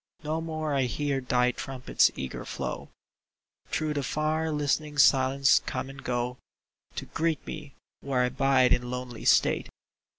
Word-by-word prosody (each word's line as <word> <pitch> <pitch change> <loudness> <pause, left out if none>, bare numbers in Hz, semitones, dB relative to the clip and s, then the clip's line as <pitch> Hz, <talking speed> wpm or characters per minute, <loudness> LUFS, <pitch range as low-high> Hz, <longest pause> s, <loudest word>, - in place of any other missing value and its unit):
No 155 +2 -2
more 155 -2 -3
I 135 -2 +2
hear 140 +2 -1
thy 125 -1 +2
trumpet's 130 0 +1
eager 65 -1 -5
flow - - -5 0.8
Through 155 -1 -1
the 145 - -1
far, 155 +3 -1
listening 150 0 -1
silence 135 0 +5
come 130 +1 -3
and 135 0 -12
go 125 0 -2 0.6
To - - -4
greet 165 -1 -1
me 150 -3 -8 0.2
where 135 -2 0
I 125 - +1
bide 130 -1 +3
in 125 0 -1
lonely 125 -2 -6
state. - - +3
135 Hz, 145 wpm, -28 LUFS, 125-150 Hz, 0.8 s, silence